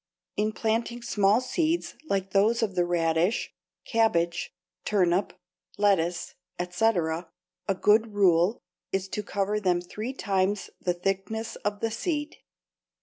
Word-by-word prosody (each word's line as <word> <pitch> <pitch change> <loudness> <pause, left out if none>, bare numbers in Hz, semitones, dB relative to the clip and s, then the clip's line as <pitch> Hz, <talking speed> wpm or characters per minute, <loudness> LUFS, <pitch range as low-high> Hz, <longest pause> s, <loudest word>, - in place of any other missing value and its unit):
In 215 +1 +1
planting 230 +2 -1
small 210 +1 +3
seeds 320 +6 0 0.2
like 195 -1 0
those 220 +4 +3
of 205 -4 -1
the 175 -1 +2
radish, 170 +3 +1 0.3
cabbage, 175 -7 +1 0.3
turnip, 185 -2 +2 0.4
lettuce, 180 -4 +1 0.2
etc., 180 -3 0 0.4
a 195 - +1
good 215 +3 +3
rule 185 +1 +4 0.3
is 195 0 -1
to 210 - -2
cover 205 +1 -1
them 180 -4 +2
three 215 +8 -5
times 195 -4 0
the 180 -1 0
thickness 195 +5 -2
of 205 0 -3
the 225 - 0
seed. 295 +5 -2
200 Hz, 125 wpm, -27 LUFS, 180-225 Hz, 0.4 s, rule